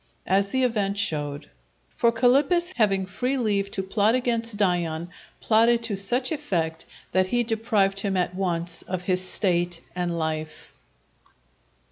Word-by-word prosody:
As 195 +1 +2
the 260 +6 0
event 205 -5 0
showed. 145 -7 -2 0.4
For 235 - +3
Calippus 290 +10 +3
having 195 -4 +2
free 250 +8 -2
leave 205 -5 0
to 195 - -3
plot 205 +4 +2
against 230 -3 -1
Dion, 175 -4 0 0.3
plotted 230 +1 +3
to 225 -3 -2
such 245 +8 +1
effect, 170 - -2 0.2
that 185 0 +2
he 240 +4 +1
deprived 220 -4 +1
him 195 -1 -1
at 180 0 0
once 175 -3 -2
of 180 -1 -5
his 185 0 0
State 175 -3 0
and 175 -1 -2
life. 155 -1 -4
195 Hz, 140 wpm, -25 LUFS, 175-230 Hz, 0.4 s, For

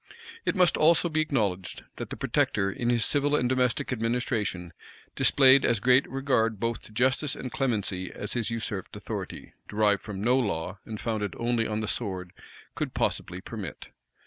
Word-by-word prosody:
It - - +2
must 180 -2 +4
also 170 +2 +4
be 155 0 +1
acknowledged, 105 -12 -1
that - - -5
the - - -6
protector, 100 -2 +1
in 120 +4 -2
his 120 -2 +2
civil 145 0 +2
and 125 - +2
domestic 125 0 +1
administration, 115 - -1 0.4
displayed 135 -1 +6
as 115 - +2
great 125 +5 +4
regard 130 -6 +1
both 115 -1 -1
to - - -10
justice 130 +5 +1
and 125 - -6
clemency, 100 -8 -1
as 105 - -4
his 115 -3 0
usurped 110 -4 -4
authority, - - -6
derived 105 -1 +2
from 105 -3 -6
no 125 +6 +3
law, 95 -5 -2
and 110 -1 -6
founded 105 -5 -2
only 115 -1 0
on 110 0 -2
the 110 - -3
sword, 95 -6 -3 0.4
could - - -4
possibly - - -1
permit. - - -7
115 Hz, 170 wpm, -27 LUFS, 105-130 Hz, 0.4 s, displayed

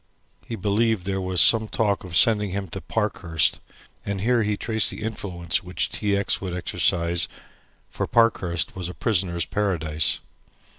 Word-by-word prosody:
He 115 - -4
believed 105 0 0
there 95 0 -2
was 95 -2 +3
some 110 -1 +8
talk 105 -2 -1
of 90 -2 -6
sending 105 +2 +5
him 95 +1 -4
to - - -7
Parkhurst, 80 -3 -1 0.4
and 100 -1 -4
here 120 +2 +2
he 105 -1 -1
traced 110 0 0
the - - -8
influence 90 -6 -2
which 90 -3 -2
T. 100 -1 -1
X. 100 - -1
would 90 -2 -4
exercise, 85 -1 0 0.6
for - - -4
Parkhurst 95 -8 +1
was 90 -2 -4
a 90 - -9
prisoner's 90 -7 0
paradise. 80 -6 -1
95 Hz, 155 wpm, -23 LUFS, 85-105 Hz, 0.6 s, some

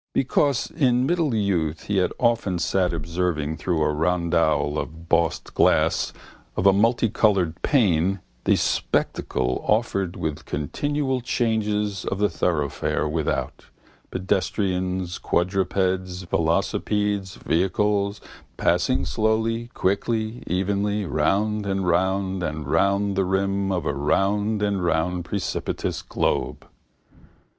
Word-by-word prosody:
Because 135 0 +1
in 125 -5 +2
middle 160 -5 +1
youth 85 -7 0
he 100 - -1
had 90 - +2
often 115 -6 +1
sat 90 +1 +1
observing 80 -1 -2
through 85 -4 0
a 75 - +1
rondel 80 -2 +1
of 80 +1 -7
bossed 85 0 0
glass - - +3 0.5
of 90 - 0
a 100 - +7
multicoloured 105 -5 +2
pane 95 - +2 0.3
the - - +4
spectacle 60 - -1
offered 100 -5 0
with 75 -2 -4
continual 130 - -2
changes 105 -5 0
of 100 - -2
the 105 0 +2
thoroughfare 75 -3 -1
without, 75 0 -2 0.4
pedestrians, 95 -1 -1
quadrupeds, 95 0 0
velocipedes, 95 +4 0
vehicles, 100 +3 0 0.4
passing 90 +9 +1
slowly, 115 +1 0
quickly, 110 +4 -1
evenly, 100 +3 0
round 100 +6 0
and 95 -1 -1
round 95 +2 +1
and 80 -3 -3
round 100 +6 +1
the 95 - +2
rim 95 +1 0
of 90 -4 -1
a 70 - 0
round 100 +9 +1
and 100 -3 0
round 85 +1 0
precipitous 100 +1 -3
globe. - - -2
95 Hz, 110 wpm, -24 LUFS, 85-105 Hz, 0.5 s, a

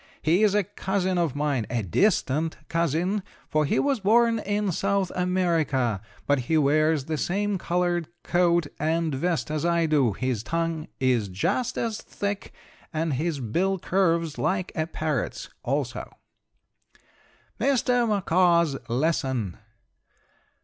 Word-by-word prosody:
He 170 +6 +3
is 210 -2 +4
a 210 - +3
cousin 190 -1 -1
of 165 -6 0
mine, 145 -6 0
a 120 -3 -1
distant 155 - +1
cousin, 170 +5 0 0.3
for 155 0 +1
he - - +1
was 275 -3 +1
born 230 +3 +3
in 205 -1 -1
South 195 +1 0
America; 165 - +1 0.2
but 145 -1 +2
he 160 - +4
wears 155 0 +3
the 155 -1 -2
same 200 +1 0
colored 175 -2 0 0.2
coat 175 -2 +2
and 160 0 0
vest 165 +3 -1
as 155 -1 -1
I 170 -1 +2
do, 145 -8 +2
his 125 0 -2
tongue 165 +2 -2
is 125 -6 +2
just 225 - -1
as 225 -2 -2
thick, 205 0 -4 0.4
and 160 -2 -1
his 155 +2 -1
bill 180 - 0
curves 170 -4 0
like 185 -1 0
a 160 -2 -1
parrot's, 155 -6 -3
also: - - -2 1.5
MR. 245 -1 +2
MACAW'S 170 -6 +3
LESSON. 130 - 0
170 Hz, 130 wpm, -26 LUFS, 150-190 Hz, 1.5 s, is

